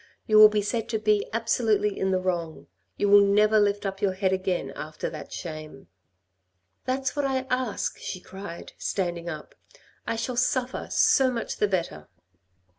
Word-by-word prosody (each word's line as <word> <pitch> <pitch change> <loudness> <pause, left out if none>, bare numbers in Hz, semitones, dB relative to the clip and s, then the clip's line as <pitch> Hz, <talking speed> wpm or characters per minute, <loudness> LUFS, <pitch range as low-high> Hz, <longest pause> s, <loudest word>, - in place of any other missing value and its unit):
You 215 -1 +5
will 215 0 +10
be 210 -1 0
said 220 +2 -2
to 225 - 0
be 210 -1 +1
absolutely 220 -2 +1
in 190 - 0
the 190 - +2
wrong. 175 -3 -3 0.3
You 205 - +1
will 205 0 +8
never 210 +2 +4
lift 205 0 +1
up 195 0 -4
your 195 -2 +1
head 190 0 0
again 185 -1 -2
after 155 0 -5
that 155 - -9
shame." 155 -4 -8 0.5
" 90 0 -49
That's 265 +2 -1
what 290 - 0
I 265 -1 -1
ask," 255 -3 -1
she 185 - -5
cried, 190 -2 -9
standing 175 -3 -2
up. 155 -3 -8 0.3
" - - -32
I 230 - -1
shall 235 +2 -3
suffer, 250 +1 0
so 265 -2 +4
much 240 -2 -4
the 210 - +2
better." 165 - -3
200 Hz, 180 wpm, -26 LUFS, 175-225 Hz, 0.5 s, will